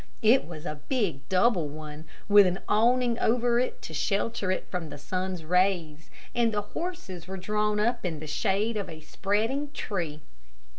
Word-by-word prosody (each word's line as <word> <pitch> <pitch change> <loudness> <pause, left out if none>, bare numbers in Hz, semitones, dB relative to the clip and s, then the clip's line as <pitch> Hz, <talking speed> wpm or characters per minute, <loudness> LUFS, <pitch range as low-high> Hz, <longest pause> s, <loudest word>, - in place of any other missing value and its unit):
It 230 +1 +5
was 160 -1 -8
a 150 -4 -5
big 180 - -1
double 185 -3 +3
one, 155 +1 -8 0.2
with 205 -1 +8
an 180 +1 -1
awning 240 +2 +3
over 240 +1 +3
it 255 - -2
to - - -7
shelter 205 -1 0
it 185 - -1
from 175 -4 -3
the - - -7
sun's 185 +3 -3
rays, 170 -3 +1 0.2
and 235 -1 +2
the 205 -1 -1
horses 320 - -5
were 190 +1 -5
drawn 210 +2 0
up 235 +3 +1
in 165 -4 -2
the 155 - -7
shade 200 +8 0
of 200 - -3
a 155 -1 -9
spreading 220 - -1
tree. 165 - -3
195 Hz, 175 wpm, -28 LUFS, 165-230 Hz, 0.2 s, with